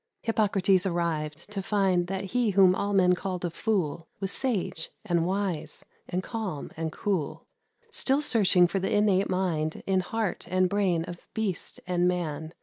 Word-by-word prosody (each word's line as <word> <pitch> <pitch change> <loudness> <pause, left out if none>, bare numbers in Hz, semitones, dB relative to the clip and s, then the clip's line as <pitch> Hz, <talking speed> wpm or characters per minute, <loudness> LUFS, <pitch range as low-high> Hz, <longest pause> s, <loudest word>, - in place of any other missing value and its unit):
Hippocrates 200 -4 +2
arrived, 165 -1 -2
to 200 -2 -3
find 190 -3 +1
That 190 0 -4
he 245 -2 +2
whom 190 -2 +6
all 200 +2 -1
men 185 -2 +4
called 180 -1 -3
a 175 - -2
fool 170 -6 -1
Was 195 -1 -1
sage, 200 -11 -1 0.2
and 170 -1 +1
wise, 190 -4 -2 0.2
and 180 +1 -1
calm, 210 - -4
and 160 0 -3
cool, 165 -6 -2 0.5
Still 280 - +2
searching 195 -9 +5
for 175 +3 0
the 190 - -2
innate 200 -2 +3
mind 170 -4 -1
In 190 -1 +2
heart 210 +1 -2
and 185 0 +3
brain 185 -4 +1
of 175 0 -10
beast 215 -5 -3
and 180 -1 +1
man. 160 -3 -2
185 Hz, 160 wpm, -27 LUFS, 175-200 Hz, 0.5 s, whom